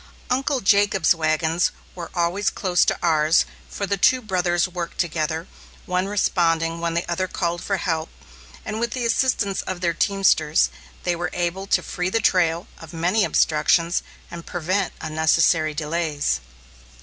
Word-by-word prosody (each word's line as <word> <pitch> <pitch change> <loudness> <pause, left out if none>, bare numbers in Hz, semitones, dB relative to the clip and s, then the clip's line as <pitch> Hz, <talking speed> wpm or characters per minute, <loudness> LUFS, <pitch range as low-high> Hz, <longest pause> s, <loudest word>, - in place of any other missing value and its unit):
Uncle 270 +1 0
Jacob's 200 -4 +4
wagons 160 +1 +1 0.2
were 170 -2 -7
always 175 +4 +1
close 180 -3 +1
to - - +1
ours, 160 -1 +3 0.2
for 200 - -3
the 200 0 -1
two 255 +7 +4
brothers 180 -5 0
worked 175 -2 -6
together, 160 -1 -1 0.4
one 180 +1 -1
responding 165 -4 +1
when 170 -1 -1
the 170 - -1
other 175 +2 -1
called 175 -1 -2
for 195 - -1
help; 160 -3 -2 0.6
and 215 0 -4
with 235 0 -1
the 250 -2 -2
assistance 230 -5 +1
of 185 -1 -5
their 170 -2 0
teamsters, 170 -5 +2 0.3
they 175 -1 0
were 175 +1 -3
able 180 +2 -2
to - - +2
free 180 0 -2
the 225 - +1
trail 170 -4 +2
of 165 0 -11
many 180 +6 +1
obstructions 165 0 +2 0.3
and 170 -1 -9
prevent 185 +3 -1
unnecessary 155 0 +2
delays. 150 - -1
175 Hz, 150 wpm, -23 LUFS, 165-195 Hz, 0.6 s, Jacob's